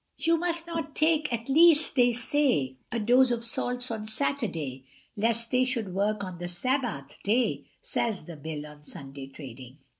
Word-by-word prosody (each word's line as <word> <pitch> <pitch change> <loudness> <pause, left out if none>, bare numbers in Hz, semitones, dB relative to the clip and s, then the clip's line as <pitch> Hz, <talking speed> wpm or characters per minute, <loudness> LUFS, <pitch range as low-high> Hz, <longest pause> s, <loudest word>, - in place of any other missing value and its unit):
You 330 +1 +2
must 340 0 -1
not 330 -3 -5
take, 310 -2 +2
at 230 0 -3
least, 320 +2 +6
they 245 -2 +5
say, 235 - +1
A 235 - -1
dose 245 +4 +5
of 235 -1 -1
salts 245 +1 -1
on 215 -1 -4
Saturday, 185 - -1 0.3
Lest 230 +2 +1
they 255 0 +3
should 235 -7 -2
work 205 +2 0
on 185 -2 -7
the 175 - -4
Sabbath 190 - -2
day, 235 +5 +1 0.2
Says 220 -5 -2
the 170 - -9
Bill 150 0 -6
on 150 -1 -13
Sunday 135 -2 -8
trading. 130 -2 -11
230 Hz, 170 wpm, -28 LUFS, 160-260 Hz, 0.3 s, least